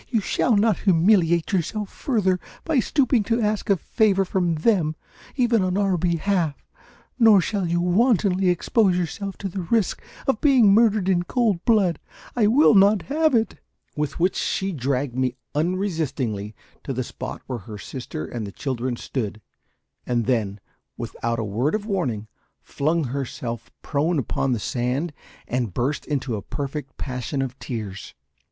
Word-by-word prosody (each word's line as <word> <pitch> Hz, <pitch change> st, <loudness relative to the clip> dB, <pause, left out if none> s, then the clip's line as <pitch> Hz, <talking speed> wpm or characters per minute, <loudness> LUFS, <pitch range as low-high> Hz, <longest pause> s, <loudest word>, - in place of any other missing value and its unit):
You 230 Hz, -, +2 dB
shall 220 Hz, +3 st, +1 dB
not 215 Hz, -1 st, +3 dB
humiliate 170 Hz, -1 st, +3 dB
yourself 195 Hz, +3 st, -1 dB
further 195 Hz, -8 st, 0 dB, 0.3 s
by 315 Hz, -5 st, +2 dB
stooping 255 Hz, -1 st, +2 dB
to 230 Hz, +2 st, +1 dB
ask 215 Hz, 0 st, -1 dB
a 200 Hz, -, +4 dB
favour 195 Hz, +2 st, +2 dB
from 180 Hz, -3 st, 0 dB
them, 160 Hz, -3 st, +2 dB, 0.4 s
even 240 Hz, -5 st, +3 dB
on 185 Hz, 0 st, 0 dB
our 195 Hz, -2 st, +2 dB
behalf; 170 Hz, -2 st, 0 dB, 0.6 s
nor 220 Hz, -4 st, +7 dB
shall 195 Hz, 0 st, -1 dB
you 170 Hz, +1 st, +1 dB
wantonly 190 Hz, 0 st, +3 dB
expose 180 Hz, +2 st, +2 dB
yourself 195 Hz, +3 st, -3 dB
to 200 Hz, -, -4 dB
the 190 Hz, +1 st, -4 dB
risk 200 Hz, +3 st, 0 dB, 0.2 s
of 270 Hz, -5 st, 0 dB
being 250 Hz, -9 st, +6 dB
murdered 215 Hz, -3 st, +4 dB
in 185 Hz, -2 st, +3 dB
cold 205 Hz, -2 st, 0 dB
blood. 200 Hz, -7 st, +3 dB, 0.4 s
I 225 Hz, -4 st, +3 dB
will 245 Hz, +4 st, +5 dB
not 200 Hz, 0 st, +5 dB
have 310 Hz, 0 st, +2 dB
it!" 225 Hz, -1 st, 0 dB, 0.4 s
With 150 Hz, 0 st, -3 dB
which, 180 Hz, +2 st, +2 dB
she 195 Hz, 0 st, -1 dB
dragged 135 Hz, -3 st, -1 dB
me 130 Hz, -1 st, 0 dB, 0.2 s
unresistingly 150 Hz, -, -1 dB, 0.3 s
to 135 Hz, -, -3 dB
the 130 Hz, +1 st, -2 dB
spot -, -, -7 dB
where 125 Hz, -2 st, -4 dB
her 105 Hz, +1 st, -9 dB
sister 110 Hz, -, -6 dB
and 110 Hz, +2 st, -5 dB
the -, -, -7 dB
children 130 Hz, +1 st, -3 dB
stood, 110 Hz, -3 st, -4 dB, 0.7 s
and 120 Hz, -2 st, 0 dB
then, 105 Hz, -5 st, 0 dB, 0.4 s
without 115 Hz, 0 st, -3 dB
a 115 Hz, -, -2 dB
word 115 Hz, -, 0 dB
of 210 Hz, -1 st, -3 dB
warning, 130 Hz, -, -2 dB, 0.4 s
flung 160 Hz, +3 st, 0 dB
herself 120 Hz, -3 st, -4 dB
prone 160 Hz, +3 st, 0 dB
upon 135 Hz, 0 st, -1 dB
the 115 Hz, -, -1 dB
sand 130 Hz, +9 st, -2 dB, 0.3 s
and 120 Hz, -7 st, -2 dB
burst 140 Hz, +5 st, -1 dB
into 135 Hz, -5 st, -1 dB
a -, -, -5 dB
perfect 140 Hz, +4 st, -5 dB
passion 135 Hz, +1 st, -3 dB
of 130 Hz, 0 st, -6 dB
tears. 105 Hz, -6 st, -6 dB
170 Hz, 160 wpm, -23 LUFS, 130-205 Hz, 0.7 s, nor